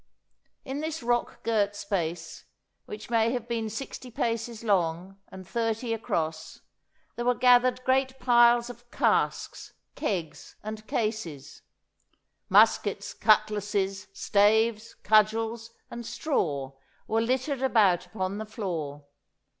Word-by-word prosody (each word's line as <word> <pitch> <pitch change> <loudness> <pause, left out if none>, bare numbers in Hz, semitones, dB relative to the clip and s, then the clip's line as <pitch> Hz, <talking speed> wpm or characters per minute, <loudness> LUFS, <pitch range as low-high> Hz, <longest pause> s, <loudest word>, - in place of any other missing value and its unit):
In 270 +2 -4
this 315 -2 -4
rock 240 0 -1
girt 205 -3 +1
space, 175 -5 -4 0.4
which 215 +2 -9
may 230 0 +3
have 245 -2 -4
been 230 -2 -2
sixty 255 +3 -7
paces 230 -1 -3
long 185 -2 0
and 190 -1 -11
thirty 225 +1 -1
across, 160 -7 -3 0.5
there 240 +1 -4
were 250 0 +3
gathered 250 0 +4
great 260 0 +1
piles 240 -1 +5
of 240 0 -17
casks, - - 0 0.2
kegs 165 -7 -4
and 215 0 -7
cases; 180 - -3 0.9
muskets, - - +3
cutlasses, 210 -2 +1
staves, 215 +3 +2
cudgels, 220 +2 +2 0.2
and 235 - -6
straw 145 - -2 0.3
were 225 +1 0
littered 260 +3 -1
about 210 -9 +3
upon 190 -1 -3
the 220 - -4
floor. 165 -10 -5
220 Hz, 115 wpm, -27 LUFS, 195-240 Hz, 0.9 s, piles